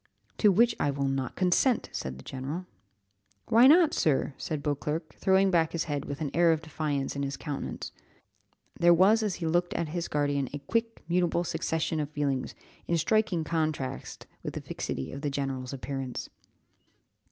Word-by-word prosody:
"To 210 - +6
which 230 +5 +4
I 145 - +2
will 140 0 -1
not 135 -2 -2
consent," 190 +7 +2
said 65 0 -5
the 65 - -12
general. 140 +7 -5 0.8
"Why 235 +3 +7
not, 320 +1 +6
sir?" 145 -2 +1
said 150 +1 -4
Beauclerc, 150 +2 -2
throwing 190 0 +3
back 165 -3 +2
his 170 - 0
head 145 -3 -3
with 140 +1 -6
an 150 - -2
air 170 0 +5
of 160 0 0
defiance 145 -3 -2
in 140 - -2
his 140 0 -3
countenance; 145 -3 -5 0.9
there 175 0 +6
was 200 +6 +5
as 210 -4 -1
he 170 - -5
looked 175 +2 +1
at 165 -2 -1
his 170 +1 -3
guardian 145 -2 0
a - - -2
quick, 230 +10 -2
mutable 175 0 +1
succession 160 -1 -1
of 145 -1 -2
feelings, 140 -3 -2 0.3
in 170 - +2
striking 190 -1 +1
contrast 155 -5 -3 0.2
with - - -5
the - - -4
fixity 65 - -4
of 140 - -7
the 145 - -1
general's 135 -2 -3
appearance. 135 -2 -5
155 Hz, 175 wpm, -29 LUFS, 140-175 Hz, 0.9 s, Why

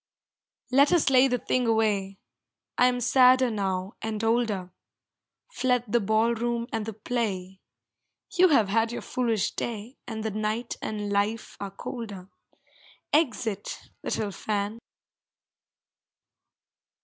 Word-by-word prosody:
Let 280 +4 +5
us 335 -6 +3
lay 260 0 +6
the 250 -1 +1
thing 250 0 0
away 205 -4 +1 0.6
I 250 - +5
am 245 0 0
sadder 255 0 +5
now 190 -1 -2
and 220 -1 -3
older; 225 -5 0 0.8
Fled 250 - +1
the 240 +3 +2
ball 220 +2 +2
room 235 0 -1
and 225 -1 -2
the 225 - -4
play 200 -4 -3 0.7
You 365 +1 +7
have 230 - +3
had 225 +2 +2
your 240 - -5
foolish 230 -5 0
day, 230 +2 -5
And 220 -2 -5
the 220 - -1
night 215 +3 -2
and 210 -1 -3
life 205 +3 -1
are 200 - -4
colder. 195 -2 -7 0.8
Exit 225 - -1
little 210 -2 -2
fan! 210 +2 -3
225 Hz, 125 wpm, -27 LUFS, 205-245 Hz, 0.8 s, You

